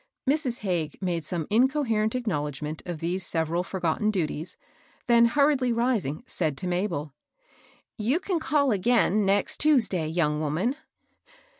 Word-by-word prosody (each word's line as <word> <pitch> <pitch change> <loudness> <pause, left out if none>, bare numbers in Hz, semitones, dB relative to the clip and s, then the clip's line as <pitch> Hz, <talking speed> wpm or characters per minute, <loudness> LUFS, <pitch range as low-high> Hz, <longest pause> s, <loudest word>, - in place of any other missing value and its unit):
Mrs. 275 -4 0
Hagges 175 -7 -2
made 175 -4 -2
some 165 +1 -2
incoherent 230 -3 +2
acknowledg 150 - -2
ment 155 +1 -5
of 170 -3 -5
these 175 +3 -2
several 165 0 0
forgotten 185 +2 -1
duties, 165 -4 -2 0.5
then 235 -1 +5
hur 285 +5 +4
riedly 255 -3 0
rising, 230 - 0
said 155 -6 -2
to 185 - -4
Mabel, 175 -6 -2 0.4
— - - -31
"You 300 +7 +3
can 370 -2 -1
call 280 -2 +1
again, 210 -1 +2
next 200 0 +1
Tuesday, 225 - +3
young 155 -2 0
woman." 165 - 0
195 Hz, 145 wpm, -26 LUFS, 160-245 Hz, 0.5 s, then